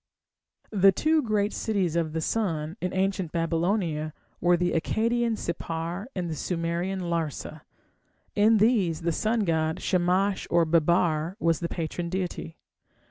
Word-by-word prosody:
The 195 -2 +6
two 310 +9 +2
great 215 -4 0
cities 195 -7 -1
of 165 -2 0
the 160 - -1
sun 165 -5 -1
in 180 - -1
ancient 190 -3 -1
Babylonia 165 -2 0 0.3
were 175 0 +4
the 175 0 0
Akkadian 230 +6 +1
Sippar 170 +3 -4
and 180 -2 -2
the 165 - -3
Sumerian 170 +4 -2
Larsa. 170 -5 -3 0.7
In 215 +2 +4
these 205 -7 +2
the 170 0 0
sun 220 +7 0
god, 160 -4 0
Shamash 185 +2 +1
or 170 -1 +4
Babbar, 165 +1 +2
was 165 -4 +2
the 170 - -3
patron 170 +1 -3
deity. 180 -3 -4
175 Hz, 135 wpm, -27 LUFS, 165-200 Hz, 0.7 s, The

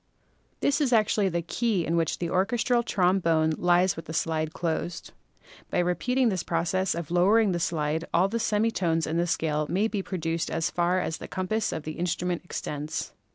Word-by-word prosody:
This 285 +2 +2
is 270 -4 +2
actually 215 -3 +3
the 170 -1 -2
key 205 0 0
in 165 - 0
which 165 -1 0
the 175 - -3
orches 195 +6 +1
tral 240 -2 +3
trombone 175 -6 +2
lies 175 +1 +3
with 165 0 -7
slide 160 -1 -1
closed. 170 0 -3 0.6
By - - -2
repeating 235 +9 +1
this 185 -4 -1
process 170 +2 0
of 170 -2 -5
lowering 200 +4 +4
the 175 - -1
slide 160 -1 -1
all 180 +3 +3
the 230 +4 -2
semi 220 +1 +1
tones 165 -5 0
in 160 +1 -2
the 170 +1 +1
scale 155 -2 0
may 195 +6 +2
be 210 -3 -2
produced 165 -3 -2
as 165 0 -1
far 175 +1 +1
as 160 - -2
the - - -8
compass 195 +3 -1
of 160 - -4
the 155 +1 -6
instrument 180 0 -1
extends. 150 -3 -4
175 Hz, 190 wpm, -27 LUFS, 165-195 Hz, 0.6 s, lowering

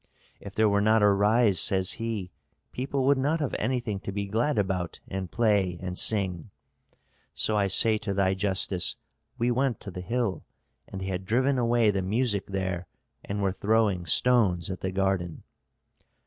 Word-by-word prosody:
'If 100 0 -10
there 110 0 +3
were 100 0 +2
not 110 +1 +3
a 105 - +6
rise,' 105 +1 +3
says 95 -1 +1
he, 110 -6 -3 0.4
'people 135 +1 -2
would 140 0 +3
not 150 +5 0
have 145 -4 -2
anything 115 -3 -2
to 100 - -6
be 100 +1 -3
glad 115 +8 0
about 95 -4 -2
and 95 -2 -5
play 100 -5 +1
and 90 -1 -5
sing.' 95 -5 0 0.9
So 110 - +1
I 100 -1 +2
say 110 +2 +3
to 100 - -4
thy 95 -1 +1
justice, 95 -2 0 0.4
we 120 +1 +1
went 130 -1 0
to 100 - -8
the 90 - -7
hill, 115 0 -2 0.4
and 95 - -7
they - - -4
had 95 -1 -3
driven 130 +6 +1
away 120 -2 +3
the 95 -1 -1
music 105 +1 0
there 95 -2 -3 0.4
and 100 0 -3
were 95 - +1
throwing 100 -3 +1
stones 95 -3 +2
at 95 - -5
the 95 - -3
garden." 95 -3 -1
100 Hz, 175 wpm, -27 LUFS, 95-115 Hz, 0.9 s, a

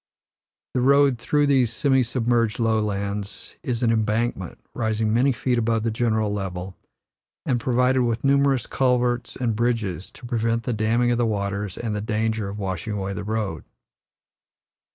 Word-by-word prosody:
The 125 - +1
road 140 -1 +4
through 145 +4 +2
these 130 -5 +3
semi 130 +2 +2
submerged 120 -2 0
lowlands 105 -3 -2
is 125 -1 -2
an 115 - +3
embankment, 110 -3 -1 0.2
rising 110 -1 0
many 130 +4 +3
feet 125 0 0
above 115 -1 +1
the 115 - 0
general 110 -2 0
level, 95 -2 -4 0.7
and 125 -3 +1
provided 125 +1 +2
with 115 -1 0
numerous 140 -1 +3
culverts 125 -2 0
and 120 -4 -1
bridges 110 -7 -1
to - - -12
prevent 115 -1 0
the 125 - -1
damming 115 +3 +2
of 120 - +1
the 120 - +2
waters 100 -2 -2
and 110 -3 -3
the 105 - -2
danger 110 -1 -1
of 100 - -6
washing 95 +1 -3
away 100 -1 -3
the 100 - -5
road. 105 -6 -3
115 Hz, 155 wpm, -24 LUFS, 105-125 Hz, 0.7 s, road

